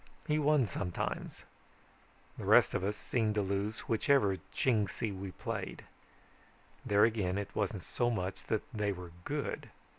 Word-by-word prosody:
He 155 -1 +2
won 150 -3 +4
sometimes. 90 -2 -3 0.9
The - - -7
rest - - +6
of - - 0
us 105 +2 -1
seemed 110 -3 0
to 105 - +2
lose 100 +3 -1
whichever 115 -4 +3
Chingsi 110 -3 +1
we 95 +1 -5
played. - - -5 1.0
There 105 0 +4
again 105 -5 +2
it 100 -1 -4
wasn't - - -1
so 120 - 0
much 95 -4 -3
that 110 - 0
they 105 -2 0
were 90 -2 -8
good. - - -3
105 Hz, 145 wpm, -33 LUFS, 95-115 Hz, 1.0 s, rest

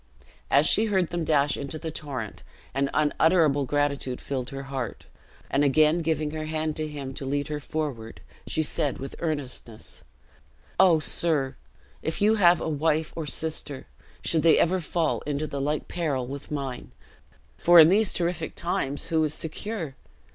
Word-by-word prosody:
As 145 +2 +5
she 220 - +5
heard 190 -5 +1
them 175 -1 -1
dash 145 -2 +2
into 140 +2 -5
the 160 0 -5
torrent, 135 -9 -5 0.3
an 135 +1 0
unutterable 155 -1 +3
gratitude 140 -2 -1
filled 130 -3 -4
her 135 0 -6
heart; 135 -3 -5 0.4
and 140 - +1
again 155 +4 +4
giving 155 -2 -1
her 155 0 -4
hand 155 0 -2
to 155 0 -2
him 140 -3 -6
to 135 - -7
lead 145 +2 -2
her 150 -1 -3
forward, 145 -7 -5 0.3
she 155 - 0
said 150 -2 -1
with 135 - -7
earnestness, 135 -8 -5 0.8
"O 180 -4 +6
sir, 150 -3 +1 0.5
if 160 - -3
you 210 +2 +4
have 180 -5 +5
a - - -3
wife 155 +1 0
or 160 -2 -4
sister 150 -2 -3 0.4
should 160 - +1
they 165 0 +5
ever 185 +2 +2
fall 165 -1 -1
into 145 +1 -1
the 140 -2 -4
like 150 +2 -1
peril 145 -7 -2
with 140 +3 -8
mine; 135 -4 -4 0.7
for 175 0 +7
in 160 0 +9
these 205 +2 +4
terrific 170 -2 -2
times, 145 -3 -2
who 160 -2 +2
is 155 0 0
secure? 165 -1 -4
155 Hz, 165 wpm, -26 LUFS, 140-165 Hz, 0.8 s, in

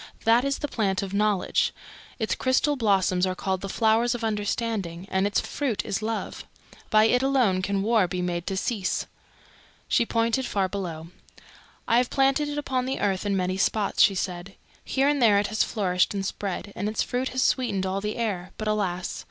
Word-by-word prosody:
That 230 +2 +4
is 275 0 0
the 295 - -3
Plant 200 -7 -1
of 195 0 -6
Knowledge; 205 -2 +1 0.4
its 220 -3 -1
crystal 265 +3 +1
blossoms 190 -6 +2
are 185 - -2
called 190 0 -2
the 195 - -5
Flowers 230 +3 +2
of 240 - -6
Understanding, 210 -4 -2
and 190 +1 +2
its 205 - +1
fruit 235 -10 -2
is 200 - -2
Love. 225 +1 -4 0.5
By 215 -1 +5
it 245 +3 +3
alone 255 -9 +2
can 195 +1 -1
war 220 -3 +3
be 180 +1 -4
made 175 -1 -2
to 195 - -2
cease." 200 -1 -1 0.8
She - - +3
pointed 230 +3 +1
far 195 -2 0
below. 170 -4 -5 0.8
"I 230 - +4
have 245 0 +2
planted 275 +2 +2
it 295 - -4
upon 260 -3 -1
the 265 - -2
earth 195 0 0
in 200 -1 +1
many 185 0 -1
spots," 205 +1 +1
she 195 - +6
said. 185 0 -4 0.3
"Here 270 +1 +1
and 290 -2 +2
there 215 -4 +6
it 205 0 +1
has 215 - +3
flourished 185 -3 0
and 195 -1 -2
spread, 200 0 -4
and 210 - -2
its 215 - 0
fruit 255 +1 -2
has 260 0 0
sweetened 200 -8 +1
all 190 +1 -2
the 210 +1 -3
air. 195 -6 -3
But, 215 - -4
alas!" 190 -4 -1
210 Hz, 195 wpm, -26 LUFS, 190-235 Hz, 0.8 s, she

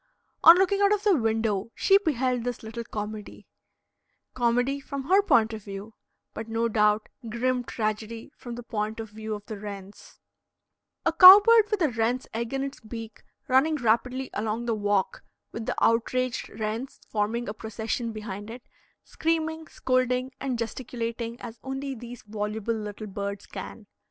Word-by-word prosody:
On 335 +2 +10
looking 390 +2 +2
out 400 0 +5
of 420 -1 +1
the 410 -3 +4
window, 225 -4 0
she 390 0 +5
beheld 255 - 0
this 245 -1 -4
little 230 +2 -6
comedy 210 -1 -7 0.9
comedy 245 +3 +1
from 275 0 -6
her 375 +8 +4
point 225 - +3
of 215 -2 -7
view, 200 +2 -8 0.4
but 225 - -6
no 225 +1 0
doubt 210 -1 +2 0.2
grim 250 +2 0
tragedy 225 +1 -4
from 240 -2 -8
the 240 - -7
point 215 -1 -3
of 220 -2 -6
view 220 0 -5
of 205 0 -10
the 215 -2 -7
wrens; 200 -1 -9 0.9
a 330 - +2
cow 370 +4 +12
bird 455 -2 +6
with 405 -4 0
a 305 - +3
wren's 230 +3 0
egg 230 +1 -3
in 270 0 -1
its 275 0 -6
beak 225 0 -9 0.3
running 270 +5 +3
rapidly 250 +1 0
along 220 +2 -2
the 235 - 0
walk 205 -2 0 0.3
with 225 -1 -6
the - - -1
outraged 240 +2 +1
wrens 220 +4 -4
forming 220 +3 -1
a 210 - -3
procession 220 +2 -4
behind 210 -1 -7
it, 240 +2 -9 0.4
screaming, 320 0 -2
scolding, 255 0 0
and 260 -3 -2
gesticulating 230 0 -4
as 230 0 -9
only 270 +1 -4
these 240 -1 -9
voluble 210 +1 -3
little 215 -1 -5
birds 200 0 -5
can. - - -8
230 Hz, 160 wpm, -27 LUFS, 215-260 Hz, 0.9 s, cow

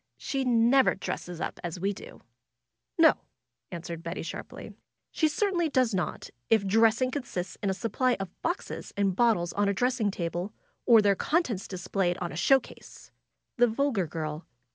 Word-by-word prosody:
^^She 270 -1 -2
never 240 +3 +4
dresses 175 -2 -5
up - - -4
as 175 0 -4
we 200 +3 0
do." - - -12 0.8
^^No 320 -2 +7 0.3
!" 120 0 -55
answered 170 -1 -6
Betty 170 +1 -5
sharply. 165 - -8 0.4
^^She 315 - +2
certainly 345 0 0
does 255 -5 +2
not, 180 -2 -3 0.2
if 220 -3 +4
dressing 225 +5 +3
consists 240 -10 -4
in 200 - 0
a - - +1
supply 245 +4 0
of 195 -3 -5
boxes 345 +3 -4
and 195 -2 +1
bot 235 0 +4
tles 175 0 -4
on 205 0 +2
a 200 - 0
dressing 245 -1 +1
table, 175 +2 -3 0.3
or 230 -3 +7
their 200 -1 +5
contents 255 - 0
displayed 185 -1 -1
on 175 -2 -4
a - - -7
show 270 +11 +5
case!" - - -14 0.5
The 245 0 +5
vulgar 230 - 0
girl. 155 0 -5
205 Hz, 170 wpm, -28 LUFS, 175-255 Hz, 0.8 s, ^^No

